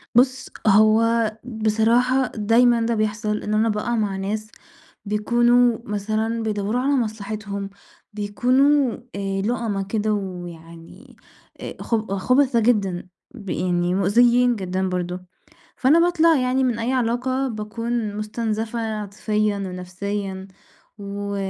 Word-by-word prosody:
بُص 260 +2 +3 0.2
هو 220 +2 +4
بصراحة 235 +3 +2
دايمًا 230 +2 +3
ده 230 0 0
بيحصل 215 0 -1
إن 210 - -2
أنا 220 +1 +2
بأقع 215 +3 -1
مع 210 -3 -1
ناس 215 +3 -4 0.5
بيكونوا 240 +3 +3
مثلًا 220 +1 -2
بيدوّروا 215 +2 -1
على 280 +2 +1
مصلحتهم، 210 -3 -3 0.4
بيكونوا 250 +6 +2 0.2
آآ 195 -1 -2
لُؤمَا 215 -2 -1
كده 215 +2 -1
ويعني 175 +3 -8 0.7
خب 215 -4 -1
خبَثا 255 +3 +3
جدًا، 195 -6 +1 0.4
يعني 180 0 0
مؤذيين 240 +5 +4
جدًا 190 -1 -2
برضه، 180 0 -3 0.6
فأنا 285 +6 +4
باطلع 335 -1 +4
يعني 255 +1 +1
من 240 -3 0
أي 245 +3 -1
علاقة 255 +2 0
باكون 225 -1 -3
مُستنزفَة 220 +1 -3
عاطفيًا 210 -1 -1
ونفسيًا، 190 +1 -5 0.5
و 200 0 -5
215 Hz, 110 wpm, -22 LUFS, 200-240 Hz, 0.7 s, هو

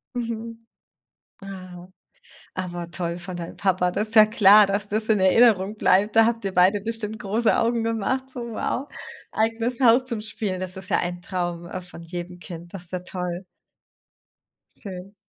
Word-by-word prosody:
Mhm. 230 -1 -5 0.7
Ah. 185 -2 -10 0.7
Aber 175 -2 -5
toll 170 -1 -3
von 175 0 -7
deinem 170 -1 -7
Papa. 185 -2 +1
Das 210 +4 -1
ist 225 - -8
ja 215 -1 +9
klar, 210 -1 +7
dass 200 +1 -1
das 215 +1 -1
in 215 -2 +3
Erinnerung 205 0 +4
bleibt. 205 +2 +3
Da 225 - +8
habt 230 -1 -1
ihr 195 -1 -2
beide 185 +3 +4
bestimmt 220 0 -4
große 215 +3 +1
Augen 230 0 +1
gemacht, 230 +4 -1
so: 245 - -6
„Wow, 235 +4 -3 0.4
eigenes 225 +2 -1
Haus 245 0 +5
zum 240 -4 -3
Spielen.“ 210 -3 -3
das 185 0 -5
ist 190 +1 -7
ja - - +3
ein 175 0 -3
Traum, 175 -2 -3
äh, 185 - -5
von 180 -2 -12
jedem 175 +1 -7
Kind, 175 -1 -10
das 190 -3 -5
ist 170 - -10
ja 180 - -2
toll. 180 0 -5 1.3
Schön. 190 -1 -8
195 Hz, 175 wpm, -24 LUFS, 180-225 Hz, 1.3 s, ja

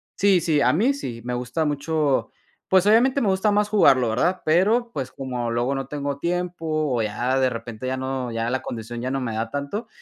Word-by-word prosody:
sí, 195 -2 +4
sí, 155 -3 +1
a - - +4
mí 225 - +2
sí, 120 - -6
me 125 - -3
gusta 125 +6 -2
mucho 150 -1 0 0.4
pues, 190 +1 +4
obviamente 255 +6 +4
me 220 - +1
gusta 190 +2 +2
más 210 0 +1
jugarlo, 135 - +4
¿verdad? 175 +11 0
Pero, 210 +9 +2
pues, 130 - -4
como 125 -3 -4
luego 120 +4 0
no 135 0 -3
tengo 140 0 -3
tiempo, 175 +1 -3 0.3
o, 115 - +1
ya 120 +5 -1
de 130 -1 +2
repente 115 0 -7
ya 130 +1 -1
no 130 -2 -3
ya 115 0 -2
la 130 +2 -2
condición 120 +1 -6
ya 125 +2 -3
no 135 0 -1
me 120 -3 -3
da 115 +1 -3
tanto, 145 +11 -4
140 Hz, 215 wpm, -23 LUFS, 125-180 Hz, 0.4 s, sí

